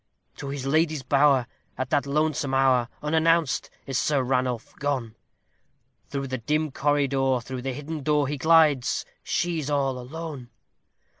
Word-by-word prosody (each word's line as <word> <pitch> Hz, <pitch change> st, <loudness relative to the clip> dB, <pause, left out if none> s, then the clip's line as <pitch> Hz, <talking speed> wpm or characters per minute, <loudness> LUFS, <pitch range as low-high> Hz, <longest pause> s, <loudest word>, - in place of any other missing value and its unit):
To 140 Hz, -, -6 dB
his 140 Hz, -1 st, -4 dB
lady's 155 Hz, 0 st, +1 dB
bower, 140 Hz, -1 st, +4 dB, 0.3 s
at 130 Hz, 0 st, -3 dB
that 140 Hz, -2 st, +1 dB
lonesome 150 Hz, -1 st, 0 dB
hour, 130 Hz, -3 st, +3 dB
unannounced, 160 Hz, -1 st, +2 dB, 0.2 s
is 135 Hz, -2 st, -1 dB
Sir 145 Hz, -3 st, +1 dB
Ranulph 125 Hz, -2 st, -1 dB
gone; 135 Hz, -6 st, -2 dB, 0.9 s
Through 140 Hz, -1 st, -3 dB
the 130 Hz, -1 st, -3 dB
dim 150 Hz, +5 st, 0 dB
corridor, 135 Hz, -2 st, +1 dB
through 125 Hz, +1 st, -6 dB
the 130 Hz, +1 st, -3 dB
hidden 150 Hz, +3 st, -6 dB
door, 150 Hz, 0 st, +2 dB
he 145 Hz, +1 st, -3 dB
glides 155 Hz, -4 st, +4 dB, 0.2 s
she 175 Hz, -2 st, -1 dB
is 150 Hz, -1 st, -4 dB
all 135 Hz, -3 st, 0 dB
alone! 140 Hz, -1 st, -7 dB
140 Hz, 145 wpm, -25 LUFS, 130-150 Hz, 0.9 s, bower